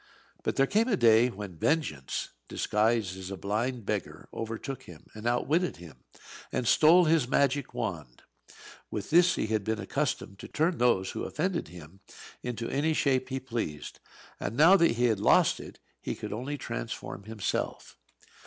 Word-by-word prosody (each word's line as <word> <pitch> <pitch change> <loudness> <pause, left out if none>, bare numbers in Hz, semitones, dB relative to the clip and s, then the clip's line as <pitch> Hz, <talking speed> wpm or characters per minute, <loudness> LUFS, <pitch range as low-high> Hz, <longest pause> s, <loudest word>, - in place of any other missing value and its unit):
But - - -2
there 135 - +4
came 215 - +2
a 215 -6 +2
day 115 -1 +5
when 95 -6 -8
Vengeance, 115 - -1 0.2
disguised 105 -3 0
as 95 0 -7
a 95 - -5
blind 110 +4 -2
beggar, - - -4
overtook 115 +4 -5
him, 80 -3 -13
and 110 +2 -5
outwitted 150 +9 +1
him, 80 -7 -14 0.5
and 125 - -1
stole 170 +7 +6
his 155 -5 +3
magic 140 +1 +1
wand. - - -5 0.7
With 105 - -5
this 175 +2 +5
he - - -1
had 110 -1 -1
been 110 +2 -1
accustomed 110 -6 -3
to - - -8
turn 160 +2 0
those 120 -6 +2
who - - -4
offended 175 +3 -2
him 85 +2 -13 0.4
into 120 -2 -4
any 155 +3 +1
shape 130 -3 +1
he 135 0 -2
pleased; 115 - -5 0.4
and 115 - -4
now 165 +6 +8
that 170 -8 +4
he 120 +1 +1
had 110 -4 +2
lost - - +4
it - - -10 0.2
he - - -3
could - - -6
only 130 +7 -4
transform 95 - -6
himself. 110 -2 -3
120 Hz, 165 wpm, -29 LUFS, 100-145 Hz, 0.7 s, now